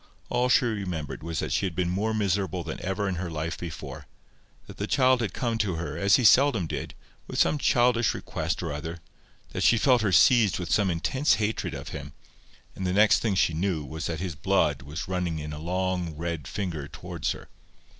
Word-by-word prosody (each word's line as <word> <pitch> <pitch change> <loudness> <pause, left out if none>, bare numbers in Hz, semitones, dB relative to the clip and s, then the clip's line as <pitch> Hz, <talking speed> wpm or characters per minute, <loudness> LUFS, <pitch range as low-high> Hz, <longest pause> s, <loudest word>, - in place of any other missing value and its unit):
All 125 +1 +1
she 125 - +4
remembered 90 - -3
was 80 0 -4
that - - -3
she 100 - +1
had 85 - -7
been 90 0 0
more 105 +4 0
miserable 95 -4 0
than 80 - -6
ever 95 +2 -1
in 95 -2 -2
her 90 - -3
life 80 +1 -3
before; 80 -1 -7 0.6
that - - -12
the 100 - -3
child 130 -1 +3
had 105 -5 -1
come 115 0 -2
to 100 -6 0
her, 85 +2 -4
as 100 -1 +4
he 125 - +2
seldom 120 -3 +5
did, - - -5 0.3
with - - -6
some 150 - +3
childish 120 -3 +3
request - - -3
or - - -3
other; 80 +3 -5 0.5
that - - -4
she 115 - +5
felt 125 +1 +4
herself 100 -4 +6
seized 115 -6 +4
with 85 0 +1
intense 100 - +2
hatred 110 0 -2
of - - -7
him; - - -7 0.6
and 95 - -3
the 90 - 0
next 105 +2 +5
thing 110 -4 0
she 85 - +2
knew 85 -2 -1
was 80 +2 -5
that 80 -2 -3
his 90 -2 -3
blood 70 - +1
was 70 +4 -6
running 90 -3 -1
in 75 0 -5
a 75 - -6
long 90 0 -2
red 80 -3 -4
finger 85 -8 -4
towards 85 +1 -4
her. - - -12
90 Hz, 205 wpm, -27 LUFS, 80-110 Hz, 0.6 s, herself